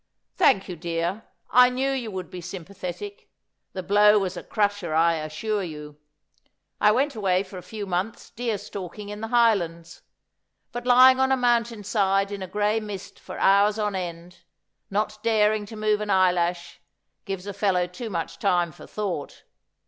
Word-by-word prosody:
' -, -, -55 dB
Thank 195 Hz, -8 st, +3 dB
you, 180 Hz, -, -5 dB
dear. 170 Hz, +5 st, -3 dB, 0.3 s
I 250 Hz, 0 st, +7 dB
knew 265 Hz, +2 st, -1 dB
you 255 Hz, -4 st, -3 dB
would 185 Hz, -3 st, -6 dB
be 180 Hz, -, -7 dB
sympathetic. 195 Hz, -, -7 dB, 0.4 s
The 185 Hz, -, -5 dB
blow 210 Hz, +3 st, +5 dB
was 190 Hz, -2 st, -1 dB
a 175 Hz, -, -5 dB
crusher, 205 Hz, -6 st, -1 dB
I 165 Hz, +1 st, +4 dB
assure 160 Hz, +8 st, -2 dB
you. 150 Hz, -4 st, -8 dB, 0.8 s
I 210 Hz, -, +5 dB
went 275 Hz, +6 st, +1 dB
away 190 Hz, -3 st, +1 dB
for 185 Hz, -1 st, -9 dB
a -, -, -10 dB
few 205 Hz, +4 st, -6 dB
months 190 Hz, +4 st, -3 dB
deer 230 Hz, -2 st, -2 dB
stalking 200 Hz, 0 st, -8 dB
in 210 Hz, +1 st, -7 dB
the 225 Hz, -, -3 dB
Highlands; 180 Hz, -9 st, +1 dB, 0.7 s
but 240 Hz, +1 st, -6 dB
lying 255 Hz, +1 st, +7 dB
on 265 Hz, 0 st, +3 dB
a 265 Hz, -, +4 dB
moun 240 Hz, -2 st, +3 dB
tain 230 Hz, -3 st, -9 dB
side 195 Hz, -1 st, +1 dB
in 200 Hz, -1 st, -5 dB
a 185 Hz, -, -4 dB
gray 210 Hz, +3 st, +1 dB
mist 205 Hz, -3 st, -8 dB
for -, -, -9 dB
hours 200 Hz, +2 st, +4 dB
on 210 Hz, -1 st, -1 dB
end, 175 Hz, -1 st, -6 dB, 0.5 s
not 210 Hz, +1 st, -1 dB
daring 215 Hz, -2 st, +2 dB
to 220 Hz, -, -9 dB
move 215 Hz, -1 st, +1 dB
an 210 Hz, -, -4 dB
eyelash, 180 Hz, -2 st, +1 dB, 0.4 s
gives 195 Hz, -1 st, -5 dB
a 200 Hz, -, -5 dB
fellow 190 Hz, -3 st, +1 dB
too 225 Hz, +6 st, -7 dB
much 165 Hz, -3 st, -4 dB
time 175 Hz, -4 st, +1 dB
for -, -, -13 dB
thouwht. 190 Hz, -9 st, -5 dB
200 Hz, 180 wpm, -25 LUFS, 180-215 Hz, 0.8 s, I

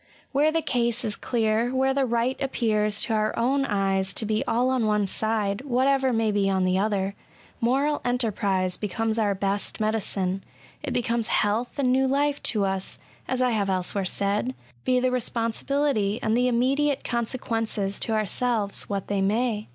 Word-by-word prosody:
Where 295 Hz, +3 st, +3 dB
the 325 Hz, 0 st, 0 dB
case 240 Hz, -3 st, 0 dB
is 210 Hz, -, 0 dB
clear, 225 Hz, 0 st, 0 dB
where 265 Hz, +1 st, +1 dB
the 270 Hz, -1 st, +1 dB
right 235 Hz, +2 st, +1 dB
appears 215 Hz, -6 st, +1 dB
to 225 Hz, -, 0 dB
our 215 Hz, 0 st, 0 dB
own 270 Hz, +4 st, +2 dB
eyes 195 Hz, -3 st, 0 dB
to 220 Hz, -, 0 dB
be 215 Hz, 0 st, 0 dB
all 250 Hz, +3 st, +2 dB
on 250 Hz, -4 st, +1 dB
one 210 Hz, -1 st, +2 dB
side, 210 Hz, +1 st, -1 dB
whatever 265 Hz, 0 st, +2 dB
may 225 Hz, -2 st, +1 dB
be 200 Hz, -1 st, +1 dB
on 190 Hz, -1 st, +1 dB
the 185 Hz, +1 st, +2 dB
other> 200 Hz, -1 st, 0 dB, 0.5 s
moral 275 Hz, +5 st, +1 dB
enterprise 200 Hz, -7 st, 0 dB
becomes 220 Hz, +2 st, -1 dB
our 205 Hz, -2 st, +1 dB
best 200 Hz, +1 st, -2 dB
medicine 195 Hz, -3 st, -1 dB, 0.2 s
| 125 Hz, -, -26 dB
it -, -, -4 dB
becomes 235 Hz, -2 st, 0 dB
health 215 Hz, +4 st, 0 dB
and 260 Hz, -3 st, +2 dB
new 265 Hz, +1 st, +3 dB
life 285 Hz, +2 st, +1 dB
to 210 Hz, -3 st, +2 dB
us, 190 Hz, -1 st, -3 dB, 0.3 s
as 255 Hz, 0 st, 0 dB
I 250 Hz, -, +2 dB
have 210 Hz, -3 st, 0 dB
else^ 185 Hz, -2 st, 0 dB
where 200 Hz, -, -1 dB
said, 200 Hz, +6 st, -1 dB, 0.3 s
be 255 Hz, 0 st, +3 dB
the 255 Hz, 0 st, +1 dB
responsibility 230 Hz, -1 st, 0 dB
and 220 Hz, +1 st, +2 dB
the 250 Hz, +1 st, +3 dB
immediate 270 Hz, +4 st, +1 dB
consequences 225 Hz, -4 st, -2 dB
to 225 Hz, -, -1 dB
ourselves 215 Hz, 0 st, -1 dB
what 200 Hz, -2 st, -2 dB
they 200 Hz, -1 st, -1 dB
may. 215 Hz, +2 st, 0 dB
225 Hz, 175 wpm, -25 LUFS, 205-255 Hz, 0.5 s, Where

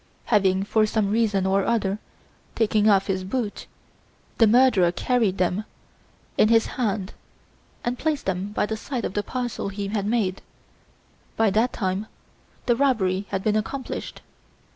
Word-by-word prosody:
Having, 195 Hz, -3 st, +2 dB
for 215 Hz, +1 st, +2 dB
some 210 Hz, -2 st, 0 dB
reason 210 Hz, -4 st, +1 dB
or 195 Hz, +1 st, +2 dB
other, 205 Hz, -3 st, 0 dB, 0.6 s
taken 215 Hz, -1 st, +3 dB
off 195 Hz, -1 st, +4 dB
his 190 Hz, -2 st, -2 dB
boots, 210 Hz, +1 st, -3 dB, 0.7 s
the 225 Hz, -, +7 dB
murderer 220 Hz, -6 st, +5 dB
carried 220 Hz, -1 st, +1 dB
them 185 Hz, +2 st, 0 dB, 0.8 s
in -, -, +6 dB
his 225 Hz, -1 st, +4 dB
hand 210 Hz, -5 st, -2 dB, 0.7 s
and 240 Hz, +1 st, -2 dB
placed 305 Hz, -2 st, -1 dB
them 190 Hz, 0 st, -1 dB
by 210 Hz, -, 0 dB
the 220 Hz, -, -3 dB
side 245 Hz, +1 st, -4 dB
of -, -, -4 dB
the 205 Hz, -, 0 dB
parcel 245 Hz, -2 st, -4 dB
he 200 Hz, 0 st, -4 dB
had 205 Hz, -1 st, -1 dB
made, 210 Hz, -5 st, 0 dB, 1.0 s
by 220 Hz, -2 st, +3 dB
that 225 Hz, +5 st, +2 dB
time 190 Hz, +1 st, -2 dB, 0.6 s
the 240 Hz, -, +3 dB
robbery 205 Hz, -8 st, +1 dB
had 195 Hz, -1 st, -2 dB
been 215 Hz, -1 st, +1 dB
accomplished. 245 Hz, +5 st, -4 dB
210 Hz, 150 wpm, -24 LUFS, 195-230 Hz, 1.0 s, the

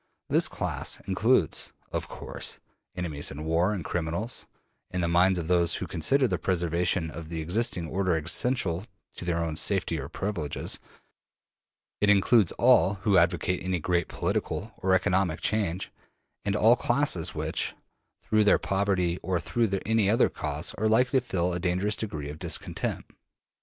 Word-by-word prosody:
This -, -, +4 dB
class -, -, -2 dB
includes, -, -, +1 dB, 0.2 s
of -, -, -3 dB
course, -, -, -6 dB, 0.4 s
enemies 80 Hz, -5 st, -2 dB
in 75 Hz, +3 st, -7 dB
war, 85 Hz, +5 st, +2 dB
and 95 Hz, -7 st, -4 dB
criminals; 90 Hz, +8 st, -3 dB, 0.4 s
in 90 Hz, -, -3 dB
the 85 Hz, -, +1 dB
minds 90 Hz, +2 st, +4 dB
of 85 Hz, -2 st, -3 dB
those 85 Hz, -2 st, +2 dB
who -, -, -3 dB
consider 125 Hz, -, +2 dB
the 90 Hz, -5 st, -1 dB
preservation 85 Hz, -1 st, 0 dB
of 80 Hz, 0 st, -8 dB
the 85 Hz, -1 st, -4 dB
existing 85 Hz, +1 st, -1 dB
order 90 Hz, 0 st, 0 dB
essential 90 Hz, -, +1 dB, 0.3 s
to -, -, -5 dB
their 85 Hz, -1 st, 0 dB
own 80 Hz, -1 st, -3 dB
safety 90 Hz, -5 st, +1 dB
or 70 Hz, +1 st, -6 dB
privileges, 85 Hz, -5 st, -3 dB, 1.2 s
it 105 Hz, -, +3 dB
includes 105 Hz, -1 st, +4 dB
all 120 Hz, -5 st, +4 dB
who 105 Hz, -3 st, +3 dB
advocate 90 Hz, +1 st, +1 dB
any 90 Hz, 0 st, -1 dB
great 85 Hz, +2 st, 0 dB
political 110 Hz, +3 st, -2 dB
or 95 Hz, 0 st, +2 dB
economic 90 Hz, -2 st, +1 dB
change, 95 Hz, -4 st, -1 dB, 0.5 s
and -, -, 0 dB
all -, -, +6 dB
classes -, -, +1 dB
which, -, -, -1 dB, 0.5 s
through 110 Hz, 0 st, +3 dB
their 105 Hz, -, +5 dB
poverty 95 Hz, -3 st, 0 dB
or 90 Hz, -2 st, -1 dB
through 115 Hz, +6 st, 0 dB, 0.2 s
any 110 Hz, -2 st, +2 dB
other 115 Hz, +4 st, +4 dB
cause, 75 Hz, 0 st, -4 dB
are 110 Hz, -, +2 dB
likely 125 Hz, +4 st, +3 dB
to 125 Hz, -, -13 dB
feel 90 Hz, -5 st, 0 dB
a 90 Hz, -, -2 dB
dangerous 95 Hz, +4 st, 0 dB
degree 75 Hz, -11 st, -5 dB
of 75 Hz, -, -10 dB
discontent. 85 Hz, -3 st, -2 dB
90 Hz, 155 wpm, -27 LUFS, 85-105 Hz, 1.2 s, all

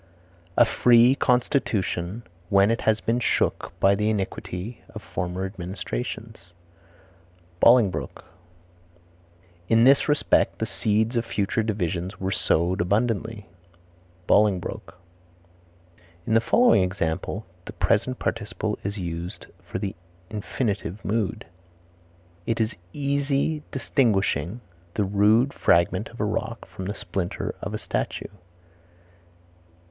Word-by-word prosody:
"A 120 Hz, -, +7 dB
free 120 Hz, +2 st, +5 dB
constitution 120 Hz, -6 st, 0 dB, 0.3 s
when 100 Hz, +2 st, +5 dB
it 115 Hz, -, -1 dB
has 110 Hz, -1 st, +2 dB
been 115 Hz, +2 st, 0 dB
shook -, -, 0 dB
by 100 Hz, -, +5 dB
the 105 Hz, +2 st, +1 dB
iniquity 100 Hz, +1 st, -4 dB
of -, -, -7 dB
former 90 Hz, +2 st, -3 dB
administrations." 90 Hz, -, -6 dB, 1.1 s
Bolingbroke. 115 Hz, -5 st, +3 dB, 1.4 s
"In 115 Hz, 0 st, +5 dB
this 135 Hz, +4 st, +5 dB
respect 145 Hz, 0 st, +2 dB
the 110 Hz, -, -1 dB
seeds 110 Hz, +3 st, 0 dB
of 115 Hz, -, +1 dB
future 110 Hz, -1 st, -1 dB
divisions 95 Hz, -3 st, -2 dB
were 95 Hz, 0 st, -2 dB
sowed 90 Hz, 0 st, +1 dB
abundantly." 110 Hz, +2 st, 0 dB, 0.8 s
Ibid. 100 Hz, -4 st, +2 dB, 1.3 s
In -, -, 0 dB
the 115 Hz, -, +5 dB
following 240 Hz, -, +4 dB
example 90 Hz, +2 st, -2 dB, 0.2 s
the -, -, -8 dB
present 130 Hz, 0 st, +1 dB
participle 110 Hz, -1 st, -3 dB
is 100 Hz, +2 st, -3 dB
used 85 Hz, -1 st, -5 dB, 0.2 s
for -, -, -5 dB
the 100 Hz, -1 st, -4 dB, 0.4 s
infinitive 105 Hz, -2 st, -3 dB
mood: 105 Hz, -2 st, -1 dB, 1.0 s
"It 115 Hz, 0 st, 0 dB
is 110 Hz, +1 st, 0 dB, 0.2 s
easy 140 Hz, +1 st, 0 dB
distinguishing 105 Hz, -, 0 dB, 0.3 s
the 105 Hz, -, +1 dB
rude 105 Hz, +7 st, +3 dB
fragment 90 Hz, +3 st, +2 dB
of 120 Hz, -, -14 dB
a 105 Hz, -, +1 dB
rock 115 Hz, +2 st, -3 dB
from 95 Hz, -, -8 dB
the 105 Hz, +3 st, -3 dB
splinter 90 Hz, -3 st, -3 dB
of -, -, -4 dB
a -, -, -1 dB
statue." -, -, -3 dB
105 Hz, 110 wpm, -25 LUFS, 95-115 Hz, 1.4 s, A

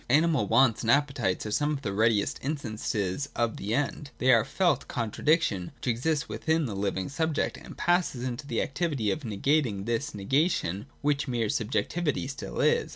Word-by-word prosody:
Animal 150 Hz, -4 st, +3 dB
wants 115 Hz, +1 st, +4 dB
and 115 Hz, -, -2 dB
appetites 135 Hz, -9 st, +2 dB
are 105 Hz, -, -4 dB
some 150 Hz, +7 st, +1 dB
of 140 Hz, -1 st, -5 dB
the 100 Hz, -, -2 dB
readiest 110 Hz, 0 st, +2 dB
instances 115 Hz, -4 st, -2 dB
of 115 Hz, -1 st, 0 dB
the 105 Hz, +4 st, -2 dB
End. 145 Hz, +1 st, -2 dB
They 130 Hz, +1 st, +4 dB
are 115 Hz, -, +6 dB
the -, -, -8 dB
felt 180 Hz, -3 st, +1 dB
contradiction, 115 Hz, -, 0 dB
which -, -, -9 dB
exists 140 Hz, +6 st, 0 dB
within 160 Hz, -1 st, 0 dB
the 115 Hz, -, -4 dB
living 95 Hz, -1 st, -1 dB
subject, 160 Hz, +1 st, -1 dB
and -, -, -11 dB
pass 175 Hz, -3 st, +2 dB
into 125 Hz, +3 st, -4 dB
the 115 Hz, -, 0 dB
activity 140 Hz, -9 st, -1 dB
of 160 Hz, -, -2 dB
negating 115 Hz, -3 st, 0 dB
this 120 Hz, +3 st, -2 dB
negation 105 Hz, -, 0 dB, 0.2 s
which 145 Hz, -1 st, +1 dB
mere 120 Hz, -4 st, 0 dB
subjec 110 Hz, +4 st, 0 dB
tivity 165 Hz, -6 st, -1 dB
still 140 Hz, +1 st, -5 dB
is. -, -, +2 dB
130 Hz, 180 wpm, -28 LUFS, 110-150 Hz, 0.2 s, are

